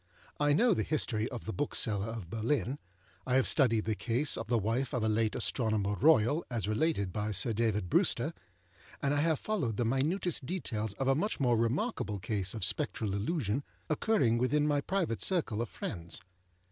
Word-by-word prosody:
I 145 0 +3
know 230 +8 +4
the - - 0
history 115 -7 -1
of 120 -3 -7
the 110 - -4
Bookseller 110 -8 +1
of 115 -6 -6
Berlin, 120 +3 -1 0.5
I 125 - +1
have 130 - +4
studied 115 -7 +3
the 110 - 0
case 125 +7 0
of 115 - -5
the 120 +1 +2
wife 115 +5 -1
of 120 - -1
a - - +2
late 110 0 +1
Astronomer 110 -4 0
Royal 145 +3 +3
as 115 -5 -2
related 110 - 0
by 105 0 -2
Sir 105 +3 +2
David 105 -4 0
Brewster, - - +2 0.7
and 140 0 0
I 145 - +2
have 160 -1 +2
followed 140 - -2
the 120 - +1
minutest 150 - 0
details 110 - -3
of 135 +6 -3
a 135 - +5
much 200 +10 -1
more 125 -4 +3
remarkable 115 - -1
case 95 0 -1
of 110 - -3
Spectral 105 -3 -1
Illusion 115 - -1 0.3
occurring 145 - +2
within 145 +4 +2
my 145 -1 +1
private 175 - -1
circle 150 - +1
of 120 - -3
friends. 85 +1 -6
120 Hz, 185 wpm, -31 LUFS, 110-145 Hz, 0.7 s, a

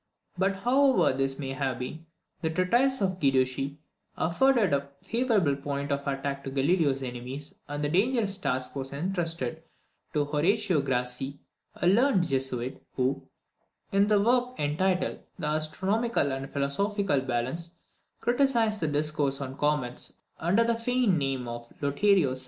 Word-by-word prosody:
But, 195 +2 +1
however 260 - +3
this 135 0 0
may 135 -2 -4
have 135 -2 -2
been, 155 +6 -6 0.3
the 160 - 0
treatise 240 +10 +2
of 185 -2 0
Guiducci 135 0 +1 0.4
afforded 225 - +3
a 140 0 0
favourable 220 - +2
point 140 +1 -3
of 140 0 -2
attack 140 0 -2
to 135 - -4
Galileo's 140 0 +1
enemies, 130 +4 -6
and 145 0 -3
the 145 - +1
dangerous 205 - +1
task 130 -7 -2
was 135 -1 -4
entrusted 165 -3 -2 0.5
to 145 -1 +2
Horatio 170 +4 +2
Grassi, 130 +1 -2 0.4
a - - -2
learned 195 -1 +4
Jesuit, 130 -2 -2
who, 130 +1 -1 0.6
in 200 +2 +3
a 210 - +5
work 250 +4 +2
entitled 180 +6 0 0.2
The - - -4
Astronomical 155 +5 +1
and 135 +1 -4
Philosophical 165 +3 0
Balance, 130 +8 -3 0.5
criticised 240 -4 +2
the 155 - +1
discourse 145 -2 0
on 135 -1 -5
comets, 145 -4 -1 0.2
under 185 +8 +3
the 230 0 +1
feigned 230 -6 +2
name 135 -3 -2
of 120 0 -7
Lotario 150 +2 +3
Sarsi. 130 - -3
150 Hz, 140 wpm, -28 LUFS, 135-200 Hz, 0.6 s, a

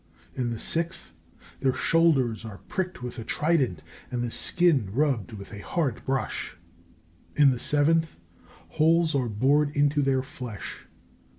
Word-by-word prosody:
In 125 -2 -2
the 115 - -3
sixth, 165 +7 -2 0.5
their 130 -1 +1
shoulders 135 -10 +2
are 110 -3 -8
pricked 185 -9 -3
with 125 0 -6
a - - -4
trident 135 - 0 0.3
and 120 -1 -2
the 120 - -3
skin 160 - +2
rubbed 130 -5 0
with 100 0 -9
a 100 - -7
hard 135 0 -2
brush. 135 -8 -2 0.8
In 145 -2 +6
the 125 - -2
seventh, 160 +4 +2 0.5
holes 160 +1 +3
are 130 -4 0
bored 140 +8 +3
into 145 0 +3
their 135 -1 +1
flesh. 125 -5 -8
135 Hz, 140 wpm, -26 LUFS, 120-160 Hz, 0.8 s, In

